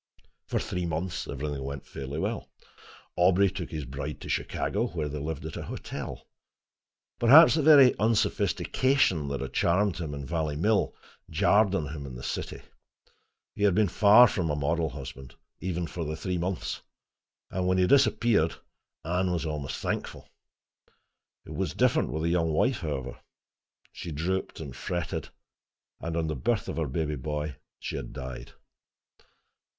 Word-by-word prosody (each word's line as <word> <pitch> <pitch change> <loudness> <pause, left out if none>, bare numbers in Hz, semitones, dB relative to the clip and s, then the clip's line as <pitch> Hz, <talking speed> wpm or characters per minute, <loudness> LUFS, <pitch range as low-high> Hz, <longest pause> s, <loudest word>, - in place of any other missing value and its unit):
For - - -1
three 90 -1 -3
months 85 +2 -3
everything 70 0 -4
went 70 0 -6
fairly 70 +2 -6
well. - - -3 0.7
Aubrey 90 +2 +4
took 95 -3 -5
his 75 -3 -5
bride 70 +3 -5
to - - -8
Chicago, 110 +5 -1
where 80 -8 -3
they 75 +1 -4
lived 75 0 -4
at - - -6
a - - -4
hotel. - - -6 0.9
Perhaps 145 +8 +8
the 155 - +2
very 140 -4 +7
unsophistication 110 - +2
that 70 0 -3
had - - -5
charmed 95 +2 +2
him 75 -4 -4
in 70 -1 -6
Valley 80 -1 -1
Mill 105 +7 +1 0.3
jarred 100 +4 +3
on 75 -7 -2
him 70 -2 -6
in 65 - -8
the - - -8
city. - - -4 0.9
He - - -9
had 100 -3 +4
been 105 -1 +4
far 110 +6 +7
from 90 -6 -1
a 75 - 0
model 80 +2 0
husband, 65 -1 -9 0.2
even 90 -2 -2
for 80 +2 -5
the 80 0 -3
three 90 +3 -2
months, 90 +1 -3 0.7
and 90 0 -1
when 95 0 +2
he 90 - +4
disappeared 115 - +3 0.5
Anne 90 +2 0
was 85 -1 -1
almost 75 -3 -3
thankful. - - -4 1.2
It - - -8
was - - -2
different - - +2
with 80 +1 -2
the 85 - +1
young 85 -2 +1
wife, 120 - +2
however. 70 -6 -4 0.7
She 85 - -7
drooped 90 +6 -2
and 70 -6 -7
fretted, 85 -1 -3 0.7
and 85 0 -3
on 80 - 0
the 80 -1 -2
birth 65 - 0
of - - -4
her 80 -2 0
baby 75 +1 -2
boy, 75 0 -4 0.2
she - - -5
had - - -7
died. 65 -1 -7
85 Hz, 160 wpm, -28 LUFS, 75-95 Hz, 1.2 s, Perhaps